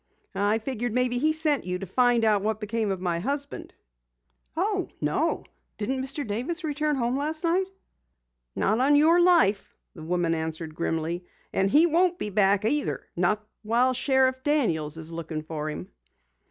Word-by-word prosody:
"I 205 +2 +1
figured 240 0 -3
maybe 250 0 +1
he 310 +4 +3
sent 310 -3 +2
you 180 0 -3
to 195 - -6
find 240 +3 +3
out 210 -2 +3
what 215 +1 -1
became 220 0 -2
of 190 -2 -2
my 175 -2 -1
husband." 280 +8 -4 0.9
"Oh, - - 0
no! - - 0 0.3
Didn't 260 +5 -2
Mr. 275 +2 -3
Davis 255 - -2
return 300 -1 0
home 245 0 0
last 310 +3 -2
night?" 360 +3 +1 0.9
"Not 215 +4 +1
on 280 +3 +4
your 325 +4 +5
life!" 335 - +3 0.2
the 165 - -11
woman 170 +1 0
answered 160 0 -4
grimly. 165 +2 -2 0.3
"And 195 0 +2
he 300 +10 +6
won't 350 +2 +2
be 210 - -4
back 200 0 +3
either 290 +6 0
not 210 +5 0
while 235 +4 +2
Sheriff 260 0 +2
Daniels 170 - 0
is 160 0 -7
looking 160 -2 -5
for 155 -1 -4
him." 90 - -6
225 Hz, 165 wpm, -26 LUFS, 180-285 Hz, 0.9 s, he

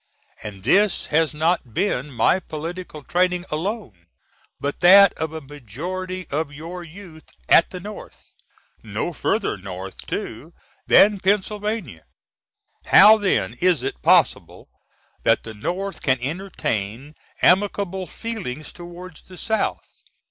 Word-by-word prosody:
And 100 -3 -8
this 195 - +3
has 160 0 +3
not 155 -6 -1
been 150 -8 -1
my 135 +8 +2
political 165 -1 -7
training 180 +2 0
alone 155 - -4 0.5
but 145 0 -3
that 195 +3 +8
of 160 -1 -4
a 160 0 -6
majority 170 - -6
of 145 0 -2
your 165 +5 -8
youth 170 -2 -13 0.2
at 170 - +6
the 180 - -7
North 210 +4 -11 0.5
no - - -4
further 210 - -1
North 95 0 -8
too - - -6 0.3
than 205 0 +6
Penna. 205 - -1 0.9
How 215 +3 +8
then 200 -2 0
is 175 -7 +3
it 135 - -4
possible - - +2 0.5
that - - +2
the 110 - -8
North 185 - -4
can 130 -1 +2
entertain 135 - -4 0.3
amicable 190 0 +2
feelings 190 - -6
toward 175 -1 -10
the 185 - -13
South? 220 +4 -1
175 Hz, 120 wpm, -22 LUFS, 140-190 Hz, 0.9 s, that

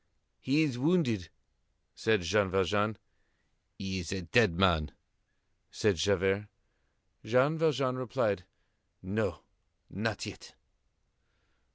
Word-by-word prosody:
"He 145 +4 +2
is 130 -6 -2
wounded," 125 - +1 0.6
said 110 -3 +1
Jean 100 +3 +2
Valjean. 100 +3 +1 0.8
"He 95 -1 -3
is 85 - -6
a 95 -2 -3
dead 90 0 +3
man," 85 -6 +2 0.8
said 105 -5 +1
Javert. 95 +4 +1 0.8
Jean 130 +7 +3
Valjean 140 -5 +1
replied: 105 -6 -1 0.6
"No. 105 +4 -2 0.5
Not - - -2
yet." - - -10
105 Hz, 95 wpm, -31 LUFS, 95-125 Hz, 0.8 s, dead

